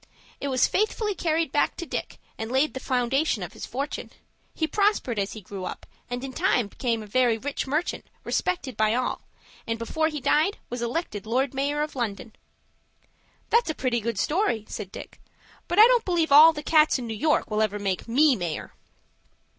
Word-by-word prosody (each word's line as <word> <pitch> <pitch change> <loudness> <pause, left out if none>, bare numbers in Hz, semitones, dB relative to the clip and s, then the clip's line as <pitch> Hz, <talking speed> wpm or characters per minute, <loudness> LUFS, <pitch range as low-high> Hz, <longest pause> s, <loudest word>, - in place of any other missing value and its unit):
It 280 - -3
was 260 -2 +3
faithfully 425 0 0
carried 325 -3 0
back - - +1
to 340 - -5
Dick, - - -5 0.2
and 220 +1 -5
laid 270 +4 +2
the 260 - -4
foundation 255 - 0
of 175 - -7
his - - -7
fortune. 275 +5 -4 0.5
He 320 - 0
prospered 400 - +1
as 195 0 -2
he 215 - -8
grew 190 0 -8
up, - - -7 0.2
and 245 +1 -4
in 270 -1 -6
time 255 - +1
became 230 -2 -2
a - - -9
very 235 +2 +2
rich 280 +4 -4
merchant, 305 +6 -2 0.2
respected 355 -8 -2
by 215 +1 +2
all, 250 0 -1 0.5
and 230 0 -1
before 315 +8 0
he 305 -2 -4
died 310 +9 +2
was 245 0 -4
elected 235 - -3
Lord 260 +4 0
Mayor 285 +2 0
of 300 - -6
London." 225 -3 -4 1.2
"That's 465 -5 +3
a 315 - -1
pretty 250 -3 0
good 230 -1 -3
story," 295 - 0
said 195 -3 -6
Dick; - - -10 0.5
"but 350 - -2
I 430 - +10
don't 485 -1 +4
believe 340 -4 0
all 305 +3 +10
the 295 -2 -7
cats 305 -1 +4
in 250 - -5
New 225 - -4
York 300 +2 +1
will 215 0 +1
ever 210 -1 0
make 195 -1 -2
me 275 +4 +4
mayor." 175 -6 -4
260 Hz, 195 wpm, -26 LUFS, 225-315 Hz, 1.2 s, I